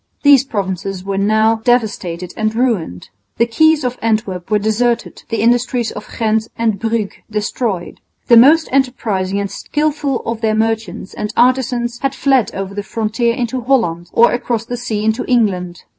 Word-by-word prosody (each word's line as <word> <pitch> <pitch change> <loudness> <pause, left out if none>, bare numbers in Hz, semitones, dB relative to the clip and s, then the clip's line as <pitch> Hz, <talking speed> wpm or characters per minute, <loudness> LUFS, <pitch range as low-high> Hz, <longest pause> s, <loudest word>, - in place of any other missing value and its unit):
These 280 -2 +6
provinces 195 -4 -4
were 195 0 -2
now 220 +2 +3
devastated 210 -7 -1
and 215 0 -1
ruined. 215 - -1 0.3
The 235 - +3
quays 310 +6 +3
of 250 0 -3
Antwerp 215 -5 -1
were 210 - +3
deserted, 230 +3 -1
the 230 - -1
industries 245 0 +1
of 210 - -9
Ghent 220 -1 +1
and 220 -4 0
Bruges 225 -2 -2
destroyed. 210 -3 -3 0.3
The 240 - +6
most 300 +7 +6
enterprising 215 -8 0
and 200 -1 -3
skilful 295 +2 -2
of 230 -1 -3
their 220 -1 +1
merchants 220 -3 -2
and 210 - -4
artisans 245 -1 +1
had 275 0 -2
fled 270 -5 +2
over 195 0 -4
the 205 - -3
frontier 225 +3 -1
into 245 +1 -2
Holland 200 -10 0
or 235 - +5
across 235 -2 -2
the 245 - -4
sea 220 -3 -3
into 220 +3 +1
England. 185 -8 0
225 Hz, 160 wpm, -17 LUFS, 205-245 Hz, 0.3 s, These